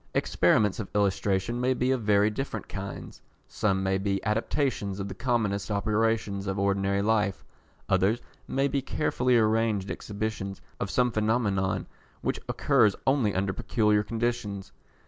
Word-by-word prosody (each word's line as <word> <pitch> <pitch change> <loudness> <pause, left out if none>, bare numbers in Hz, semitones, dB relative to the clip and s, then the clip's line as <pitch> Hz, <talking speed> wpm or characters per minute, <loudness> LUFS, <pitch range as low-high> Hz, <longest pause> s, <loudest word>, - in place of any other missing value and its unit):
Experiments 90 +8 +2
of 105 - -4
illustration 100 +3 +1
may 130 +1 +2
be 125 +1 +1
of 130 -2 0
very 105 0 +3
different 135 +6 -4
kinds. 100 -1 -7 0.3
Some 95 -2 0
may 95 0 +1
be 100 0 0
adaptations 105 -2 -1
of 95 - -3
the 100 - -6
commonest 105 -3 -1
operations 105 -1 0
of 95 0 -2
ordinary 100 0 +1
life, 105 -3 +1 0.4
others 100 +4 +2 0.3
may 135 +1 +1
be 140 -1 -1
carefully 125 -3 +1
arranged 110 -3 +1
exhibitions 105 -2 -4 0.2
of 100 - -2
some 125 +5 +2
phenomenon 105 -4 0 0.4
which - - -1
occurs 105 -2 +3
only 130 -7 +2
under 95 0 0
peculiar 105 +1 +2
conditions. 115 -3 -3
105 Hz, 140 wpm, -27 LUFS, 100-115 Hz, 0.4 s, very